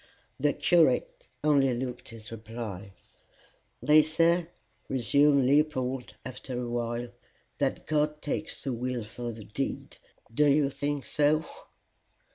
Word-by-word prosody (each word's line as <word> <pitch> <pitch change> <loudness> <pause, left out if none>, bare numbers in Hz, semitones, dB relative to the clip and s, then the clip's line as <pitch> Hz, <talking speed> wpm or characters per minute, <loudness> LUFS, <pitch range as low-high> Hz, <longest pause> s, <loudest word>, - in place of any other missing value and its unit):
The 145 +1 +2
curate - - +2 0.2
only 140 -4 +3
looked 125 0 -5
his 115 -1 -11
reply. 110 -4 -7 0.9
"They 150 +1 +7
say," 165 +2 +2 0.4
resumed 140 +2 +3
Leopold, 135 -4 +1
after 130 0 -6
a 125 - -3
while, 120 0 -2 0.5
"that - - -1
God 150 0 0
takes 150 +2 -3
the 135 -4 -2
will 125 0 -3
for 120 +2 -6
the 110 -1 -9
deed: 135 +7 -4 0.4
do 150 +5 +4
you 140 0 +3
think 145 0 -3
so?" 150 +1 +2
135 Hz, 120 wpm, -28 LUFS, 120-150 Hz, 0.9 s, They